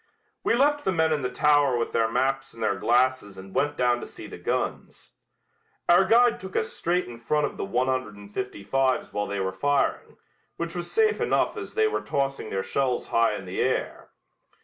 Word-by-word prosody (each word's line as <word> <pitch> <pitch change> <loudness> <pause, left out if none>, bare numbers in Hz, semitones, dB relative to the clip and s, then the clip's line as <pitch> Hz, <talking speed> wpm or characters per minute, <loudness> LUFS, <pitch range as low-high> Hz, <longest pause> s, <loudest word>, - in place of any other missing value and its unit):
We - - +2
left 290 +3 +2
the 190 - +1
men 160 -2 +2
in 150 - -1
the 125 - -1
tower 145 -1 +3
with 115 - -2
their 115 -1 +1
maps 135 0 -1
and 115 - -6
their 110 - +2
glasses 120 0 +1
and 95 0 -11
went 145 +1 0
down 125 -1 +2
to - - -7
see - - -10
the - - -9
guns. 60 - -3 0.8
Our 175 +2 +6
guide 235 +4 +4
took 190 0 -9
us - - -1
straight 180 +2 0
in 120 -1 -10
front 150 +5 +1
of - - -5
the - - -3
one 120 +6 0
hundred 130 -5 -2
and 100 0 -13
fifty 125 -5 -5
fives 130 +5 0
while 105 0 -1
they 100 0 -3
were 95 0 -1
firing, 145 +8 0 0.4
which 170 0 -4
was 175 -1 -5
safe 440 -1 +2
enough - - +1
as - - -7
they 440 0 +3
were 435 - -1
tossing 135 -5 -2
their 95 0 -2
shells 125 +5 -1
high 115 -2 +2
in 95 - -7
the 90 +1 -5
air. - - -2
130 Hz, 215 wpm, -26 LUFS, 110-160 Hz, 0.8 s, Our